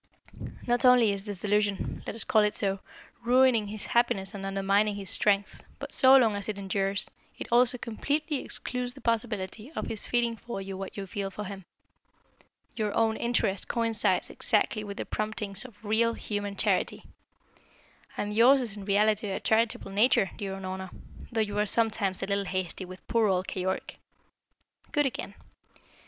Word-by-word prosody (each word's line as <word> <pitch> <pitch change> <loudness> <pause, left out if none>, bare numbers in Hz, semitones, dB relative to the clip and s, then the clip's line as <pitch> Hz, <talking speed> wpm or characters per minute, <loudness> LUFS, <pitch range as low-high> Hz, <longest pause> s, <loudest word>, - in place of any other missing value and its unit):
Not 240 +1 +1
only 250 -4 +6
is 200 0 -4
this 205 -4 -5
delusion 205 -1 0
let - - -4
us 225 - 0
call 215 - +3
it 210 0 +1
so 195 -1 0 0.4
ruining 245 -3 +4
his 210 0 -6
happiness 205 -4 +1
and 200 -1 -7
undermining 195 +2 +1
his 195 -2 -5
strength, 200 -1 +1 0.2
but - - -7
so 265 +1 +7
long 225 -5 +3
as 200 +1 -4
it 210 - -3
endures, 195 0 -1 0.3
it - - -5
also 245 +1 +5
completely 285 +6 -2
excludes 250 0 -3
the 270 - -13
possibility 220 0 -2
of - - -3
his 215 - +1
feeling 235 -1 +1
for 235 -2 -6
you 195 0 -6
what 195 +1 -7
you 200 - -4
feel 195 0 -4
for 210 +2 -6
him. 195 -2 -8 1.1
Your 215 -2 -1
own 225 -1 +2
interest 225 -5 0
coincides 230 -2 +1
exactly 215 - +1
with 200 -1 -7
the - - -3
promptings 215 0 -3
of 235 -5 -12
real, 230 +2 +2
human 205 -1 -4
charity. - - 0 1.1
And 205 0 -2
yours 245 +6 +6
is 230 -6 0
in 200 -2 -8
reality 210 +1 +2
a 190 - -2
charitable 220 -3 +1
nature, 205 -1 +3
dear 195 -3 -5
Unorna, 190 0 -6 0.4
though 225 -1 +1
you 205 -1 -1
are 210 - +1
sometimes 205 -4 +1
a - - +1
little 200 0 0
hasty 185 0 -3
with 185 +1 -12
poor 230 -2 +2
old 185 -1 0
Keyork. 190 0 -3 0.9
Good 295 -1 +2
again. 220 -6 -4
210 Hz, 170 wpm, -28 LUFS, 195-230 Hz, 1.1 s, so